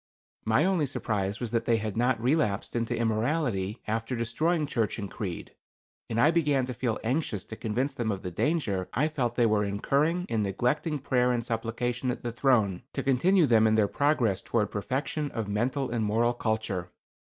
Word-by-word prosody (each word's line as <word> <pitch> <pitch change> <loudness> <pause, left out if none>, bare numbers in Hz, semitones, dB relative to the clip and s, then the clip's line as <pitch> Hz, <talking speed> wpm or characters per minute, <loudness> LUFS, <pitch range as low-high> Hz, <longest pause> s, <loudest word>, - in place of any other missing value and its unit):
My 110 +9 +3
only 180 -6 +2
surprise 100 -5 -2
was 120 -3 -4
that 115 -1 0
they 115 - +3
had 110 -2 -3
not 120 +1 +2
relapsed 120 -6 0
into 115 0 -1
immorality, 115 -2 0
after 115 +3 -2
destroying 150 +8 0
church 115 -7 -1
and 100 -3 -5
creed, 95 -7 -5 0.6
and 115 - -1
I 150 +7 +5
began 145 -6 +2
to 125 - -5
feel 115 -2 -1
anxious 115 - -1
to 110 - -8
convince 120 +6 -2
them 115 -2 -1
of 95 -1 -4
the 90 - -4
danger 100 - 0
I 150 +4 +2
felt 125 -6 -2
they 120 - +3
were 105 -2 +2
incurring 140 - 0
in 110 - 0
neglecting 125 - 0
prayer 125 -3 +1
and 120 -2 -1
supplication 120 +2 -2
at 125 - -3
the 120 - -2
throne 110 -6 +2
to 135 - -2
continue 165 +7 +4
them 110 -4 +5
in 110 - +3
their 110 -2 +3
progress 130 -7 +1
toward 110 -3 0
perfection 140 +7 -2
of 110 -3 -3
mental 125 +6 -1
and 115 -2 0
moral 115 +3 +2
culture. 110 -6 -2
120 Hz, 185 wpm, -28 LUFS, 110-135 Hz, 0.6 s, I